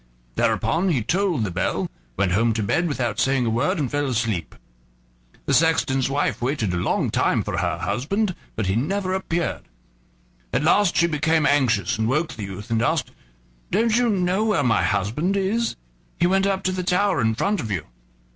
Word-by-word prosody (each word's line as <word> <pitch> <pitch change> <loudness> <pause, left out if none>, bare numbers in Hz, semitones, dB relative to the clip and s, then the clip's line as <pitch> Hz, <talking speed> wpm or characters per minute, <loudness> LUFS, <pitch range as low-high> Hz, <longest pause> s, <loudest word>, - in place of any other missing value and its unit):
Thereupon 180 - +1
he 135 -10 +1
tolled 180 - 0
the 100 - -2
bell, - - -1 0.3
went 95 -2 +1
home 115 +5 +2
to 110 -1 -1
bed 175 - +1
without 120 -8 -2
saying 135 -2 +2
a 115 - 0
word, 150 - +1
and 140 -6 -2
fell 145 0 0
asleep. 115 - -2 0.9
The - - 0
sexton's 135 -5 +2
wife 140 -1 -1
waited 120 -7 -1
a - - -1
long 85 - 0
time - - +1
for - - -3
her - - -1
husband, 195 - -1 0.2
but 110 - -2
he 95 +1 0
never 185 - -1
appeared. 175 -3 -2 0.9
At 125 +5 +1
last 175 +3 +3
she 170 - +5
became 160 -1 +1
anxious, 120 -10 +2
and 110 +1 +1
woke 155 +5 0
the 110 - -9
youth, 100 +3 -8
and 115 -1 +2
asked: 120 - 0 0.6
"Don't 220 +3 +2
you 245 0 +3
know 190 0 +1
where 200 -9 +2
my 115 -3 +2
husband 110 - 0
is? 215 +5 0 0.4
He - - +3
went 195 +2 +2
up 195 -1 -1
to 185 - +1
the 185 0 -2
tower 180 -2 +1
in 110 -1 +1
front 200 - 0
of 115 - -4
you." 90 -7 -2
145 Hz, 190 wpm, -23 LUFS, 115-185 Hz, 0.9 s, she